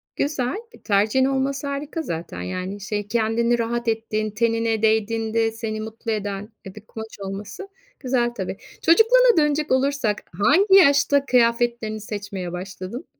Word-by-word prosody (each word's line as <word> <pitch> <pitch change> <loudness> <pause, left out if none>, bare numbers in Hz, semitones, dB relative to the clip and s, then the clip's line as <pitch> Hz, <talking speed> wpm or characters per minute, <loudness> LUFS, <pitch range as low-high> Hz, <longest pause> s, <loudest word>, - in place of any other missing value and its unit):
Güzel, 265 -3 -1 0.2
e, - - -17
tercihin 215 +5 +2
olması 270 +1 -1
harika 285 +4 -4
zaten. 165 - -5
Yani, 185 - -5
şey, 205 0 -3
kendini 235 +2 +1
rahat 235 +1 -2
ettiğin 220 -1 -1
tenine 225 0 0
değdiğinde 225 +1 +1
seni 220 -1 -4
mutlu 225 +1 -5
eden, 205 0 -4
eee, 190 - -9
bir 215 0 -12
kumaş 220 -1 -9
olması 200 - -7 0.3
güzel, 245 -2 0
tabii. 190 -3 -5 0.2
Çocukluğuna 465 +7 +5
dönecek 300 0 +1
olursak, 260 -5 +1 0.2
hangi 380 - +5
yaşta 285 -5 +5
kıyafetlerini 235 -3 +1
seçmeye 200 -4 -5
başladın? 185 - -7
225 Hz, 135 wpm, -23 LUFS, 210-270 Hz, 0.3 s, Çocukluğuna